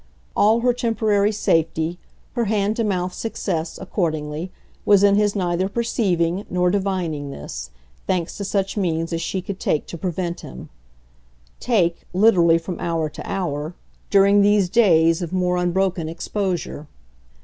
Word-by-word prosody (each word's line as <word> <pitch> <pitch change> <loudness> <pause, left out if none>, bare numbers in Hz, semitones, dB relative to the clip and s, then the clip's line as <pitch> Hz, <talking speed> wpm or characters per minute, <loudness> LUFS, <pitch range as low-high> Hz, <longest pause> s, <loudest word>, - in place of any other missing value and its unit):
All 220 +3 +4
her 245 0 +3
temporary 220 -4 +1
safety, 165 -3 0 0.3
her 240 -2 0
hand 210 0 0
to 230 - +1
mouth 185 -3 -1
success, 175 -7 -3
accordingly, 160 -3 -3 0.3
was 200 -1 +5
in 200 0 +6
his 205 0 +2
neither 185 0 0
perceiving 195 -5 0
nor 180 0 +2
divining 180 -7 -2
this, - - -7 0.4
thanks 180 -3 -1
to 205 - -4
such 195 0 -1
means 165 -4 -1
as 165 - -1
she 185 +2 -3
could 190 0 -6
take 150 - 0
to 170 - -8
prevent 175 0 -3
him; 60 - -10 0.9
take, 180 -9 0
literally 180 -5 +5
from 165 +1 -6
hour 165 -2 -1
to 150 - -9
hour, 160 -3 -3 0.3
during 200 0 +5
these 205 -2 +3
days 165 -6 +4
of 170 - -4
more 180 -1 +1
unbroken 180 -2 0
exposure. 175 -3 -3
180 Hz, 145 wpm, -22 LUFS, 165-200 Hz, 0.9 s, in